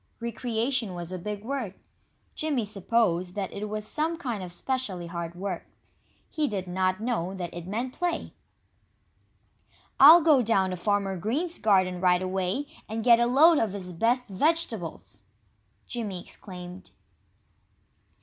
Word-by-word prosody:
"Recreation" 235 Hz, -2 st, -2 dB
was 175 Hz, 0 st, -6 dB
a 185 Hz, -, -4 dB
big 205 Hz, +3 st, -5 dB
word. 235 Hz, -6 st, -4 dB, 0.6 s
Jimmy 290 Hz, -8 st, -1 dB
supposed 195 Hz, -3 st, 0 dB
that 200 Hz, -2 st, -3 dB
it 210 Hz, +1 st, -5 dB
was 215 Hz, 0 st, -3 dB
some 315 Hz, +6 st, 0 dB
kind 240 Hz, -, -4 dB
of 180 Hz, -1 st, -6 dB
specially 200 Hz, -3 st, -3 dB
hard 170 Hz, 0 st, -5 dB
work. 185 Hz, -1 st, -5 dB, 0.6 s
He 305 Hz, -2 st, -1 dB
did 195 Hz, -6 st, -3 dB
not 185 Hz, +2 st, 0 dB
know 205 Hz, -6 st, -2 dB
that 175 Hz, -2 st, -5 dB
it 175 Hz, 0 st, -7 dB
meant 235 Hz, +6 st, -3 dB
play. 350 Hz, -2 st, -2 dB, 1.7 s
"I'll 315 Hz, +6 st, +10 dB
go 300 Hz, -5 st, +5 dB
down 195 Hz, -5 st, +2 dB
to -, -, -2 dB
Farmer 200 Hz, +1 st, 0 dB
Green's 290 Hz, -, -1 dB
garden 185 Hz, -4 st, +2 dB
right 180 Hz, 0 st, +3 dB
away 190 Hz, +8 st, -1 dB, 0.2 s
and 220 Hz, +1 st, -3 dB
get 235 Hz, -1 st, +6 dB
a 240 Hz, -, +3 dB
load 300 Hz, +6 st, +6 dB
of 215 Hz, -4 st, 0 dB
his 180 Hz, -3 st, -5 dB
best 240 Hz, +8 st, +1 dB
vegetables!" 230 Hz, -, -1 dB, 0.6 s
Jimmy 215 Hz, -7 st, -4 dB
exclaimed. 180 Hz, -1 st, -9 dB
210 Hz, 140 wpm, -27 LUFS, 185-250 Hz, 1.7 s, I'll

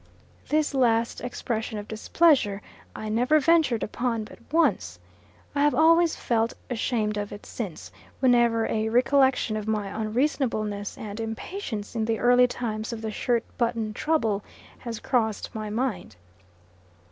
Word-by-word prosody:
This 305 Hz, -1 st, +1 dB
last 235 Hz, -3 st, +2 dB
expression 225 Hz, -3 st, -3 dB
of 205 Hz, 0 st, -6 dB
displeasure 220 Hz, -3 st, +2 dB, 0.3 s
I 215 Hz, -, -5 dB
never 245 Hz, +8 st, +3 dB
ventured 305 Hz, -6 st, +3 dB
upon 230 Hz, 0 st, -2 dB
but -, -, -13 dB
once. 205 Hz, -, +1 dB, 0.6 s
I 285 Hz, -, 0 dB
have 295 Hz, 0 st, +3 dB
always 330 Hz, +1 st, +5 dB
felt 230 Hz, -1 st, 0 dB, 0.2 s
ashamed 220 Hz, -3 st, -1 dB
of 205 Hz, 0 st, -3 dB
it 205 Hz, -, -9 dB
since, 200 Hz, -9 st, -6 dB, 0.3 s
whenever 240 Hz, -3 st, +3 dB
a 220 Hz, 0 st, -1 dB
recollection 255 Hz, -1 st, +3 dB
of 215 Hz, 0 st, -5 dB
my 210 Hz, -2 st, -1 dB
unreasonableness 215 Hz, -2 st, -1 dB
and 210 Hz, 0 st, -7 dB
impatience 225 Hz, -, -5 dB
in 220 Hz, -1 st, 0 dB
the 225 Hz, 0 st, 0 dB
early 245 Hz, +2 st, +5 dB
times 220 Hz, -3 st, -4 dB
of 225 Hz, -1 st, -6 dB
the 220 Hz, -, -2 dB
shirt 235 Hz, +1 st, 0 dB, 0.2 s
button 230 Hz, -3 st, 0 dB
trouble 225 Hz, -9 st, 0 dB, 0.4 s
has 230 Hz, -3 st, -6 dB
crossed 220 Hz, -5 st, -1 dB
my 215 Hz, -1 st, -4 dB
mind. 215 Hz, -, -3 dB
230 Hz, 140 wpm, -26 LUFS, 215-255 Hz, 0.6 s, always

